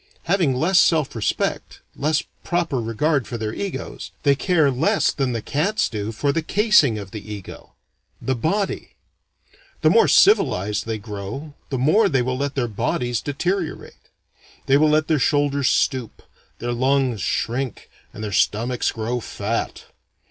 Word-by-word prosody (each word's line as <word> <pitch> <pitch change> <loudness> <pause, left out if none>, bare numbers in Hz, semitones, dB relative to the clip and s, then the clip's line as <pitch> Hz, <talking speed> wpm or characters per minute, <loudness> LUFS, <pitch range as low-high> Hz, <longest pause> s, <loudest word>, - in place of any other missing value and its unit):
Having 170 -6 +1
less 175 +8 +3
self 155 -7 +2
respect, 110 - -2 0.2
less 155 +2 0 0.2
proper 170 -7 -1
regard 120 +4 0
for 120 - -4
their 110 -1 -3
egos, 200 +6 -5
they 140 - +5
care 155 -1 +2
less 135 +5 +2
than 135 -3 -1
the 115 -3 -3
cats 195 +10 0
do 105 -1 -4
for 140 +6 0
the 165 - -1
casing 200 - +3
of 100 -2 -8
the 105 0 -8
ego, 100 -3 -9 0.5
the 130 - -1
body. 190 - -2 0.9
The - - +5
more 455 - +5
civilized 105 - +3
they 110 -1 -2
grow 105 +8 -7 0.2
the 135 - -2
more 170 - +3
they 135 -4 +1
will 130 +1 -1
let 140 0 -2
their 125 -3 0
bodies 120 +2 -1
deteriorate. 175 +4 -3 0.7
They 135 - +4
will 155 +2 +4
let 155 +1 +2
their 155 -3 +2
shoulders 140 -1 +2
stoop, 130 -5 -1 0.3
their 120 +1 -3
lungs 130 -2 +1
shrink, 125 +1 -2 0.2
and 110 - -8
their 105 - -4
stomachs 115 +5 +1
grow 115 +2 -3
fat. 110 0 -4
135 Hz, 155 wpm, -22 LUFS, 115-155 Hz, 0.9 s, they